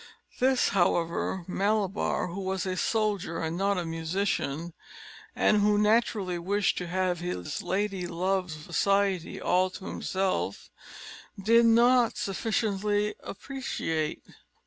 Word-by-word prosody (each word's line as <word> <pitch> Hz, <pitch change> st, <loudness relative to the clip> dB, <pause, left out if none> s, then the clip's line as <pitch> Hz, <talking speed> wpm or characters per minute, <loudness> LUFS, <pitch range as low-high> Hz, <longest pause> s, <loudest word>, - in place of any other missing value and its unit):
This, 260 Hz, 0 st, +3 dB
however, 175 Hz, 0 st, 0 dB
Malabar, 200 Hz, -1 st, 0 dB
who 190 Hz, +3 st, -5 dB
was 190 Hz, 0 st, -2 dB
a 185 Hz, -1 st, -2 dB
soldier, 205 Hz, -5 st, -1 dB
and 160 Hz, 0 st, -2 dB
not 195 Hz, +2 st, +1 dB
a 175 Hz, -, -2 dB
musician, 165 Hz, -1 st, -2 dB, 0.6 s
and 210 Hz, -1 st, +3 dB
who 205 Hz, 0 st, +3 dB
naturally 210 Hz, -4 st, +2 dB
wished 200 Hz, +3 st, +1 dB
to 180 Hz, -, -5 dB
have 180 Hz, 0 st, 0 dB
his 170 Hz, -, -4 dB
lady 195 Hz, -2 st, -1 dB
love's 180 Hz, -1 st, -1 dB
society 195 Hz, +3 st, 0 dB
all 185 Hz, +1 st, +2 dB
to 185 Hz, -, -10 dB
himself, 190 Hz, 0 st, -2 dB, 0.7 s
did 230 Hz, +4 st, +5 dB
not 240 Hz, +1 st, +4 dB
sufficiently 210 Hz, 0 st, 0 dB
appreciate. 195 Hz, -, -3 dB
190 Hz, 115 wpm, -28 LUFS, 175-210 Hz, 0.7 s, did